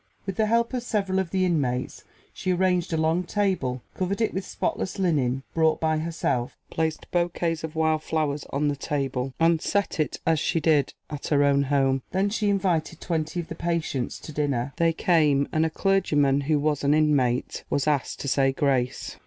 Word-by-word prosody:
With 195 -2 -4
the 220 - +2
help 235 +3 +1
of 250 - -1
several 200 -5 0
of 190 -3 -2
the 185 0 +1
inmates 135 -8 -1 0.3
she 185 - -2
arranged 180 -1 +1
a 160 - 0
long 160 +3 +1
table, 180 - -1
covered 190 +2 -2
it 225 - +1
with 190 - -2
spotless 185 - -3
linen 135 -9 +1
brought 160 -1 +2
by 155 -1 +1
herself, 155 -7 -2
placed 160 -1 -1
bouquets 170 -2 0
of 160 0 -5
wild 160 -1 +2
flowers 150 -3 -1
on 145 +2 0
the 145 - 0
table, 135 -2 -2
and 165 -1 +3
set 200 -4 -1
it 155 - -1
as 160 -2 +3
she 165 - 0
did 150 -3 +2 0.2
at 145 -1 -5
her 145 -1 +3
own 140 0 +4
home. 135 -1 +2
Then 195 +2 0
she 210 -1 0
invited 175 -5 0
twenty 160 0 -2
of 165 - -11
the - - -6
patients 165 -7 -2
to - - -8
dinner. 140 -3 -1
They 165 -1 +3
came, 155 -5 +2
and 160 +1 +2
a - - -3
clergyman, 150 -7 +2
who 150 +2 +1
was 145 0 0
an 145 +1 +4
inmate, 140 -5 +1
was 140 - 0
asked 145 -3 0
to - - -4
say 135 0 +3
grace. 130 -3 -1
155 Hz, 195 wpm, -25 LUFS, 140-180 Hz, 0.3 s, own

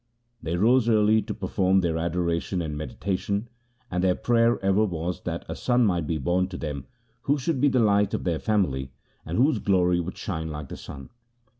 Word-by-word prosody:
They 85 +2 -2
rose 120 +4 +4
early 110 0 +4
to - - -5
perform 95 -1 +1
their 85 -2 0
adoration 85 +2 -1
and 80 -3 -3
meditation, 100 +7 -3 0.4
and 90 0 -1
their 90 -1 +3
prayer 120 0 +2
ever 95 +2 +3
was 90 -3 -3
that - - -4
a - - -5
son 125 -1 +2
might 85 -6 0
be 80 - -1
born 90 +6 +1
to 95 - -7
them 70 -4 -5 0.4
who 145 - +4
should 135 0 -1
be 145 - +5
the 130 -2 +2
light 105 -3 +3
of - - -4
their 85 -3 -1
family, 70 -12 0 0.3
and 80 - -2
whose 130 -1 +3
glory 90 -3 +2
should 90 - -7
shine 80 -4 -4
like 75 -3 -6
the - - -6
sun. 70 -2 -10
95 Hz, 195 wpm, -25 LUFS, 85-110 Hz, 0.4 s, be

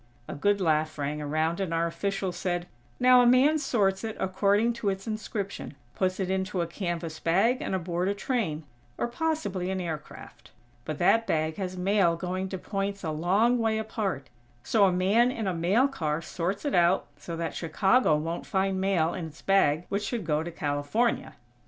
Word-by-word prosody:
A - - -5
good 205 +7 +1
laugh 155 -3 +1
rang 145 +1 -3
around, 155 +4 -1
and 190 -4 -2
our 165 0 +1
official 195 +2 -2
said: 175 0 -2 0.3
"Now 250 0 +7
a 245 - +4
man 270 +6 +5
sorts 200 -8 +1
it 220 -1 -4
according 200 +5 +2
to 205 - +1
its 195 0 -3
inscription, 215 -6 -5 0.2
puts 185 0 -1
it 190 - 0
into 190 -1 -1
a - - 0
canvas 170 -2 -4
bag 205 +10 +2
and - - -2
aboard 175 0 -1
a 200 - 0
train, 200 - -2 0.3
or - - 0
possibly 240 - -2
an 190 0 -2
aircraft. 160 -4 -7 0.4
But 155 - -4
that 225 +6 +3
bag 155 0 0
has 185 -2 -4
mail 185 -2 +2
going 185 +2 -3
to 190 - -4
points 195 +1 -3
a 160 - -2
long 195 +10 +2
way 220 -1 +1
apart, 205 - -3 0.3
so 210 -3 +4
a 190 - +3
man 200 +7 +3
in 225 -4 -4
a 190 - 0
mail 190 +10 +3
car 155 - -2
sorts 180 - -3
it 285 - -1
out, 175 +2 +3
so 170 -1 -6
that 165 -2 -3
Chicago 190 +3 +2
won't 165 +3 -3
find 190 0 0
mail 175 -4 +1
in 180 -3 -4
its 160 +1 -14
bag 175 -4 +3
which 200 +1 -1
should 225 -2 -3
go 150 -1 +1
to 170 - -4
California." 150 +10 -1
190 Hz, 190 wpm, -27 LUFS, 165-210 Hz, 0.4 s, Now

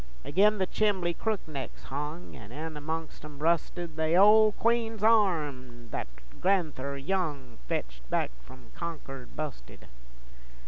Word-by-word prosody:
Agin 210 +7 +4
the 190 - +2
chimbley 190 -4 +1
crook 215 +2 -2
necks 140 -5 -6
hung, 150 +5 -5
An' 110 -3 -11
in 155 +4 -5
amongst 160 +2 -5
'em 150 -1 -9
rusted 165 +1 0
The 160 +1 +2
ole 215 +3 +8
queen's 225 -2 +1
arm 145 - +2
thet - - -3 0.3
gran'ther 155 -8 +1
Young 145 - -2
Fetched - - -4
back - - +1 0.2
f'om 130 - -14
Concord 140 -7 -7
busted. 145 - -6
160 Hz, 130 wpm, -29 LUFS, 140-190 Hz, 0.3 s, ole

